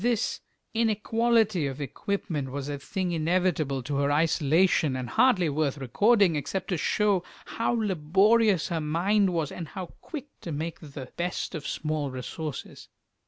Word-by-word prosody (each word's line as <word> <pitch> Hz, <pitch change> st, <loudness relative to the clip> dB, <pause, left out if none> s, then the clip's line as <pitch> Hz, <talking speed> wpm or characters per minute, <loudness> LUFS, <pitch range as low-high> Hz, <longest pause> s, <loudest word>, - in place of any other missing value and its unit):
This 235 Hz, -2 st, 0 dB, 0.3 s
inequality 225 Hz, -4 st, +2 dB
of 135 Hz, +1 st, -5 dB
equipment 150 Hz, -, -3 dB
was 140 Hz, +1 st, -4 dB
a 145 Hz, -1 st, -3 dB
thing 180 Hz, +5 st, -3 dB
inevitable 160 Hz, -5 st, 0 dB
to 140 Hz, +2 st, -2 dB
her 140 Hz, 0 st, +2 dB
isolation, 155 Hz, 0 st, +3 dB
and 130 Hz, -1 st, -3 dB
hardly 225 Hz, -8 st, +4 dB
worth 150 Hz, -1 st, 0 dB
recording, 200 Hz, -, +3 dB
except 150 Hz, +8 st, -3 dB
to 180 Hz, -, 0 dB
show 205 Hz, -1 st, +2 dB, 0.2 s
how 230 Hz, -, -1 dB
laborious 200 Hz, +1 st, +3 dB
her 165 Hz, -2 st, -1 dB
mind 190 Hz, +7 st, +2 dB
was, 165 Hz, -4 st, -1 dB
and 170 Hz, -, -6 dB
how 180 Hz, +1 st, -7 dB
quick 295 Hz, -3 st, -7 dB
to 170 Hz, -, -6 dB
make 160 Hz, +2 st, -4 dB
the 140 Hz, -4 st, -9 dB
best 175 Hz, +2 st, -2 dB
of 155 Hz, -4 st, -5 dB
small 155 Hz, -2 st, -2 dB
resources. 135 Hz, +4 st, -6 dB
165 Hz, 150 wpm, -27 LUFS, 145-205 Hz, 0.3 s, hardly